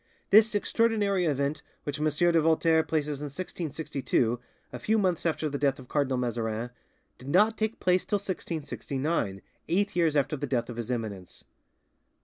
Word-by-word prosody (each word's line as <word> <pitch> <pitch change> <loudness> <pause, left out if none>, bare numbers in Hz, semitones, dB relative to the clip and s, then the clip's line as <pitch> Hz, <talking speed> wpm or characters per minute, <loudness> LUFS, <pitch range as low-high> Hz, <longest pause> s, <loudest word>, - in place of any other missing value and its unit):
This 215 +1 +6
extraordinary 205 -3 +2
event, 145 0 0 0.2
which 145 0 -4
M. 155 - +2
de 165 +2 +3
Voltaire 160 0 +4
places 150 -3 -2
in - - -3
1662, 145 -6 -2 0.3
a - - -5
few 220 +1 +1
months 180 -5 +1
after 160 -1 0
the 140 -1 -3
death 140 -1 +2
of 130 -2 -13
Cardinal 140 -3 +1
Mazarin, 120 -1 -2 0.5
did 130 - -9
not 210 +8 +4
take 220 +1 -2
place 180 0 +2
till - - -1
1669, 150 - -3 0.3
eight 200 +3 +1
years 165 -3 +2
after 145 +1 +2
the 145 0 -4
death 125 -2 -1
of 120 - -9
His 120 0 -4
Eminence. 105 -7 -4
150 Hz, 160 wpm, -28 LUFS, 130-180 Hz, 0.5 s, This